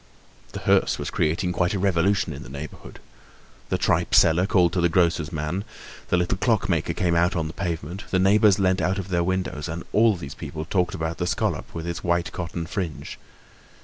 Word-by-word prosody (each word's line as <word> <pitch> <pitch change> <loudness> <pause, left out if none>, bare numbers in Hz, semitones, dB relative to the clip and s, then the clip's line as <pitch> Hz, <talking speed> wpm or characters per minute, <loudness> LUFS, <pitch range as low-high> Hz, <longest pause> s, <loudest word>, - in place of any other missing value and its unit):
The - - -5
hearse - - +3
was - - -4
creating 85 +4 0
quite 90 +2 0
a - - 0
revolution 95 -2 +1
in 70 - -8
the 65 - -10
neighborhood. 70 +2 -9 0.7
The - - +1
tripe - - +1
seller 85 +3 +5
called 90 -4 +3
to 90 - +1
the 85 - +3
grocer's 85 -2 +1
men, 80 +5 -3 0.4
the 90 - +2
little 90 +2 0
clockmaker 90 -9 +1
came 90 -1 0
out 85 +2 +2
on 85 - 0
to - - -4
the - - -8
pavement, 85 +3 -4
the 95 - +1
neighbors 100 +1 +5
leant 95 -2 +2
out 90 +4 0
of 95 -1 -5
their 85 -2 +1
windows; 90 -5 -2
and 85 +1 -5
all 110 0 +4
these 70 -5 -7
people 80 +3 -6
talked 90 +2 0
about 80 -1 -3
the 90 - -1
scallop - - -1
with 80 0 -4
its 85 0 -4
white 85 -1 0
cotton 85 -1 -4
fringe. 85 -2 -5
85 Hz, 205 wpm, -24 LUFS, 80-95 Hz, 0.7 s, seller